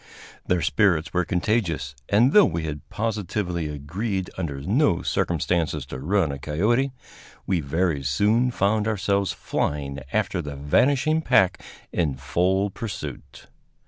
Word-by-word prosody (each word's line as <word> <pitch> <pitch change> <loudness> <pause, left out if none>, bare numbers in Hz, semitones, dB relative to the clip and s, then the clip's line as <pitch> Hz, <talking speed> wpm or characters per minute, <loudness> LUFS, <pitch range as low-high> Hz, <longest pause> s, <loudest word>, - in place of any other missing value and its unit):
Their 90 -2 +1
spirits 95 -5 +2
were 90 -1 +1
contagious, 90 -7 0 0.2
and, 115 +7 +4
though 210 - +8
we 85 -2 0
had 75 -3 -6
positively 100 -6 -2
agreed 90 +7 -3
under 75 -7 -4
no 105 - +2
circumstances 85 -1 0
to 65 - -7
run 85 +2 +1
a 70 - -6
coyote, 105 - +1 0.5
we 95 -3 +1
very 80 +1 0
soon 105 - +2
found 105 -1 +1
ourselves 100 -2 0
flying 70 -1 -2
after 100 -4 0
the 75 -2 -6
vanishing 135 - +2
pack 95 - +3 0.3
in 75 -6 0
full 90 +9 0
pursuit. 85 - -7
90 Hz, 130 wpm, -24 LUFS, 75-105 Hz, 0.5 s, though